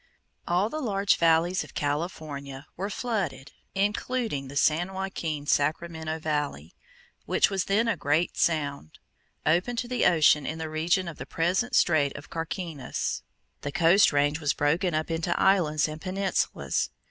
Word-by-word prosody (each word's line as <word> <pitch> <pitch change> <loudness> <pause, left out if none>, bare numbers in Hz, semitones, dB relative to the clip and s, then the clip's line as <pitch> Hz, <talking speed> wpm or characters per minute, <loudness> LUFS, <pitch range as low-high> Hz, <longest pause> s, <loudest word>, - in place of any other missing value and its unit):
All 180 +4 +2
the 310 - -3
large 200 -5 +2
valleys 170 +2 +3
of - - -15
California 145 -2 -4
were 195 +3 -3
flooded, 190 - -3 0.2
including 205 - -1
the 140 - -9
San 165 +6 +2
Joaquin 170 -6 -3
Sacramento 160 +2 0
valley, 145 - -3 0.5
which - - +3
was 190 -2 0
then 215 +4 +2
a 230 - +2
great 155 +4 0
sound, 145 - -1 0.5
open 175 +10 +2
to 240 +1 -2
the 250 -1 +2
ocean 150 -3 +4
in 160 - -3
the 160 -1 -5
region 175 +4 +1
of 170 - -7
the 125 - -7
present 180 +9 0
Strait 145 -4 +3
of 145 - -12
Carquinez. 165 -3 -3 0.4
The 145 - -4
Coast 175 +7 +5
range 145 +1 +2
was 145 -3 +1
broken 165 +4 +1
up 155 +1 -1
into 165 +1 -1
islands 160 -7 +3
and 155 0 -7
peninsulas. 190 +1 -1
165 Hz, 150 wpm, -27 LUFS, 145-190 Hz, 0.5 s, Coast